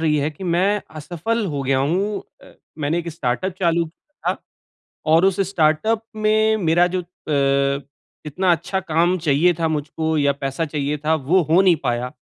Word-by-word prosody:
रही 155 -2 +2
है 145 +2 0
कि 170 +5 -10
मैं 190 +4 +1 0.2
असफ़ल 180 +9 -2
हो 140 - -2
गया 135 0 +1
हूँ 190 +9 0 0.2
ए, - - -16 0.2
मैंने 155 +3 0
एक 170 0 -4
स्टार्टअप 160 +4 -2
चालू 170 -1 +2
किया 175 - -5
था - - -16 0.8
और 165 +3 +5
उस 195 0 +1
स्टार्टअप 200 +7 +1
में 215 0 +2
मेरा 175 +2 +4
जो 180 - 0
अ, 140 -5 0 0.4
इतना 180 +5 +1
अच्छा 175 +4 -1
काम 175 +1 +1
चाहिए 160 +6 +4
था 165 - +1
मुझको 155 +1 -2
या 140 -1 +3
पैसा 135 +4 -1
चाहिए 150 0 -2
था 160 - +3 0.2
वो 185 +1 +5
हो 175 +4 +6
नहीं 185 -3 +5
पाया 125 0 -1
165 Hz, 175 wpm, -21 LUFS, 145-185 Hz, 0.8 s, हो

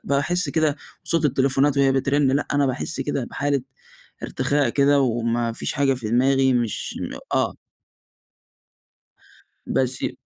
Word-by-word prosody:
باحس 150 +6 0
كده 155 -2 +1 0.3
صوت 165 -2 +1
التليفونات 135 +1 +2
وهي 135 -1 +4
بترن 135 +1 +1
لأ 145 +2 0
أنا 140 0 +2
باحس 130 +4 -3
كده 140 -3 -2
بحالة 140 +1 -1 0.6
ارتخاء 145 -2 0
كده، 140 +3 +3
وما 115 -2 0
فيش - - -3
حاجة 135 -1 +1
في 120 -4 -5
دماغي 130 +2 +3
مش 120 -3 -2 0.4
آه. - - +1 2.1
بس 130 0 -1
ي - - -3
135 Hz, 130 wpm, -23 LUFS, 130-145 Hz, 2.1 s, وهي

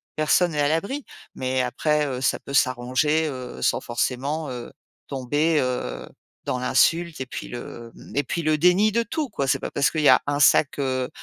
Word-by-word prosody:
personne 165 +3 +2
n'est 150 - -3
à 145 - +3
l'abri. 200 - -1 0.3
Mais 130 0 -1
après, 150 +4 0
heu, 130 -2 -4
ça - - +1
peut 140 - -10
s'arranger, 130 +5 +1
heu, 125 - -7
sans - - +1
forcément, 135 +5 -2
heu, 120 -1 -7 0.4
tomber, 145 +4 0
heu, 125 - -3 0.4
dans 125 - -1
l'insulte 165 +6 +2
et - - -2
puis - - -7
le, 120 -1 -8
mmh, - - -13
et 145 - +2
puis 170 - -3
le 155 -1 +1
déni 180 +6 +4
de 235 +2 +1
tout, 290 +3 -3
quoi. 140 - -2
C'est 130 - +1
pas - - -5
parce 140 -1 +1
qu'il 155 - -1
y 145 - +5
a 130 - +7
1 145 0 -1
sac, 145 0 +4
heu 130 -2 -1
145 Hz, 205 wpm, -24 LUFS, 130-160 Hz, 0.4 s, a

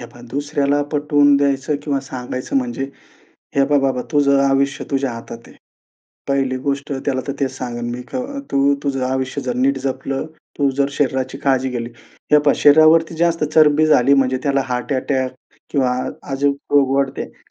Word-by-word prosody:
हे 120 - -8
पहा 120 - -16
दुसऱ्याला 145 0 0
पटवून 145 -1 +3
द्यायचं 140 +1 0
किंवा 140 -2 -1
सांगायचं 130 -1 -5
म्हणजे, 125 0 -1 0.7
हे 140 - +5
पहा 145 0 +3
बाबा 130 -2 0
तुझं 140 -1 +3
आयुष्य 135 0 0
तुझ्या 135 -3 0
हातात 115 0 -8
आहे. - - -17 0.7
पहिली 135 -2 0
गोष्ट 140 +2 -3
त्याला 130 -2 0
तर - - 0
तेच 135 -1 +1
सांगेन 120 -2 -4
मी, 120 +1 -5
की 125 - -8 0.3
तू 140 +1 +3
तुझं 135 -2 -1
आयुष्य 130 0 -2
जर 125 -1 -2
नीट 135 +2 +1
जपलं, 135 +1 -3 0.3
तू 140 -1 +3
जर 140 0 +2
शरीराची 130 -2 -1
काळजी 130 -1 +1
केली. 120 -1 -4 0.4
हे 150 - +8
पहा 145 -1 +3
शरीरावरती 155 +2 +5
जास्त 170 -1 +1
चरबी 155 0 +5
झाली 140 -2 +4
म्हणजे 130 -1 +2
त्याला 140 -1 +1
हार्ट 125 +2 -2
अटॅक 130 0 -1 0.4
किंवा 130 -4 +1 0.4
अजून 140 +1 +2 0.2
रोग 135 -2 +4
वाढतात. 135 -1 -4
135 Hz, 170 wpm, -19 LUFS, 130-145 Hz, 0.7 s, हे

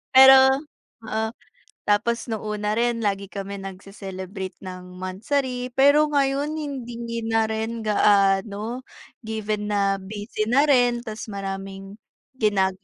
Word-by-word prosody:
Pero 265 +1 +8 0.4
oo. 220 0 -1 0.6
Tapos 230 +3 +1
nung 220 -1 -3
una 210 0 -1
rin, 235 -1 +1
lagi 200 -1 -1
kami 200 0 -6
nagse-celebrate 190 0 -7
ng 185 -1 -9
monthsary, 250 +7 -2
pero 285 +3 +5
ngayon 280 +1 +1
hindi 240 -6 -5
na 225 -1 +2
rin 220 +1 -3
gaano. 205 +3 +2 0.4
Given 215 -1 -2
na 195 -1 +2
busy 205 +2 -4
na 260 +6 +4
rin 245 -3 +3
tas 215 -2 -6
maraming 195 -1 -6 0.4
gina 205 -4 +2
215 Hz, 115 wpm, -24 LUFS, 195-240 Hz, 0.6 s, Pero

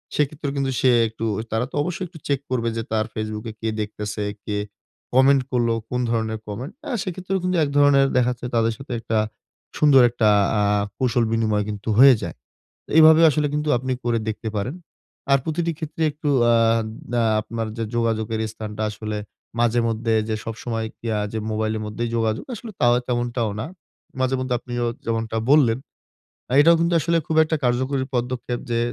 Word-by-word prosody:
সেই 150 - +3
ক্ষেত্রেও 145 -1 -5
কিন্তু 135 -1 0
সে 130 - +4 0.2
একটু 110 +1 -5 0.3
তারা 110 +2 0
তো - - -8
অবশ্যই 180 +3 -3
একটু 165 - -13
চেক 140 -2 +1
করবে 115 -2 0
যে 115 - -2
তার 110 -1 +1
Facebook 110 0 -4
এ - - -13
কে 110 - -2
দেখতেসে, 105 0 -4 0.2
কে 105 -1 -2 0.6
comment 135 +1 +5
করল, 120 -2 +1 0.2
কোন 125 - -1
ধরনের 110 -1 -1
comment? 115 +7 -5
অ্যা - - -5
সেই 185 - -3
ক্ষেত্রেও 190 +1 -2
কিন্তু 180 -1 0
এক 145 - 0
ধরনের 140 -1 +5
দেখা 125 0 +3
যাচ্ছে 125 0 -10
তাদের 115 0 +2
সাথে 135 -2 -7
একটা 115 -1 -2 0.6
সুন্দর 145 -3 +6
একটা 115 -3 +2 0.2
অ্যা 105 -2 +2 0.3
কুশল 120 -2 +1
বিনিময় 110 -2 +1
কিন্তু 105 +1 -5
হয়ে 135 -1 +9
যায়। - - -5 0.6
এইভাবে 160 0 +8
আসলে 150 +1 0
কিন্তু 150 0 -1
আপনি 130 +1 -3
করে 120 -1 +1
দেখতে 110 0 -3
পারেন। 125 +9 -3 0.6
আর 140 - +6
প্রতিটি 165 +1 -1
ক্ষেত্রে 160 0 -5
একটু 150 +1 -4 0.2
অ্যা 120 0 +4 0.6
অ্যা 120 -1 +2 0.2
আপনার 115 +1 -4
যে 115 - -2
যোগাযোগের 115 -1 0
স্থানটা 110 -1 -6
আসলে 105 0 -5 0.4
মাঝে 120 0 +3
মধ্যে 115 0 0
যে 110 - 0
সবসময় 115 0 -4
কি 115 - -10
আ - - 0
যে 110 - -2
মোবাইলের 110 0 -1
মধ্যেই 115 +2 -3
যোগাযোগ 110 -1 0
আসলে 225 +1 -8
তাও 120 0 +5
তেমনটাও 120 -2 -1
না। - - -3 0.5
মাঝে 130 0 +1
মধ্যে 130 -1 -1
আপনিও 120 0 -3 0.2
যেমনটা 115 -1 -2
বললেন, 130 -6 +5 0.8
এটাও 170 +3 +6
কিন্তু 170 +1 +2
আসলে 170 +3 +1
খুব 160 - -1
একটা 160 0 -1
কার্যকরী 130 +2 +1
পদক্ষেপ 120 0 -2
যে 115 - +1
120 Hz, 180 wpm, -22 LUFS, 110-140 Hz, 0.8 s, হয়ে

